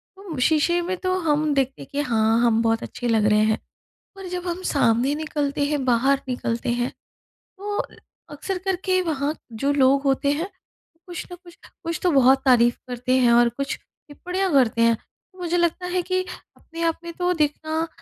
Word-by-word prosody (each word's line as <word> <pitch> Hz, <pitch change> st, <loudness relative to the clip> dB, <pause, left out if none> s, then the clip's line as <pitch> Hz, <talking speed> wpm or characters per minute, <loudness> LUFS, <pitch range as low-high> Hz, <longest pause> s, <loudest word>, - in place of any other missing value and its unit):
तो 380 Hz, -6 st, -8 dB
शीशे 320 Hz, +5 st, +2 dB
में 365 Hz, +2 st, -2 dB
तो 370 Hz, +1 st, -1 dB
हम 305 Hz, -3 st, +1 dB
देखते 270 Hz, -1 st, -1 dB
हैं -, -, -11 dB
कि 285 Hz, 0 st, -1 dB
हाँ 225 Hz, 0 st, +3 dB
हम 230 Hz, -1 st, +3 dB
बहुत 225 Hz, 0 st, +1 dB
अच्छे 245 Hz, -, -5 dB
लग 220 Hz, -2 st, +2 dB
रहे 210 Hz, 0 st, +4 dB
हैं। 220 Hz, 0 st, +2 dB, 0.6 s
और 385 Hz, -1 st, -8 dB
जब 360 Hz, 0 st, -5 dB
हम 350 Hz, +2 st, -3 dB
सामने 260 Hz, -4 st, +2 dB
निकलते 295 Hz, -2 st, -2 dB
हैं 290 Hz, -2 st, -1 dB
बाहर 260 Hz, +3 st, +3 dB
निकलते 235 Hz, -2 st, -2 dB
हैं, 240 Hz, +1 st, 0 dB, 0.7 s
तो 410 Hz, +1 st, -4 dB, 0.6 s
अक्सर 370 Hz, +6 st, -4 dB
करके 375 Hz, 0 st, +1 dB
वहाँ 300 Hz, -4 st, -1 dB, 0.3 s
जो 280 Hz, -, +3 dB
लोग 275 Hz, 0 st, +4 dB
होते 280 Hz, +1 st, +2 dB
हैं 325 Hz, +6 st, -2 dB, 0.6 s
कुछ 350 Hz, -2 st, -6 dB
ना -, -, -6 dB
कुछ 350 Hz, -1 st, -17 dB, 0.3 s
कुछ 335 Hz, -1 st, -3 dB
तो 360 Hz, -, +3 dB
बहुत 270 Hz, -1 st, +5 dB
तारीफ़ 240 Hz, -2 st, +4 dB
करते 250 Hz, +1 st, 0 dB
हैं 245 Hz, -2 st, +4 dB
और 240 Hz, 0 st, +5 dB
कुछ 275 Hz, +4 st, -4 dB
टिप्पणियाँ 360 Hz, +5 st, -5 dB
करते 240 Hz, -4 st, +3 dB
हैं, 230 Hz, 0 st, +5 dB
तो 370 Hz, -, -25 dB
मुझे 350 Hz, 0 st, -1 dB
लगता 345 Hz, +1 st, 0 dB
है 360 Hz, 0 st, 0 dB
कि 370 Hz, +1 st, -1 dB, 0.4 s
अपने 330 Hz, 0 st, -10 dB
आप 330 Hz, -1 st, 0 dB
में 340 Hz, -, -6 dB
तो 360 Hz, +1 st, 0 dB
दिखना 315 Hz, +1 st, -1 dB
290 Hz, 185 wpm, -23 LUFS, 250-350 Hz, 0.7 s, बहुत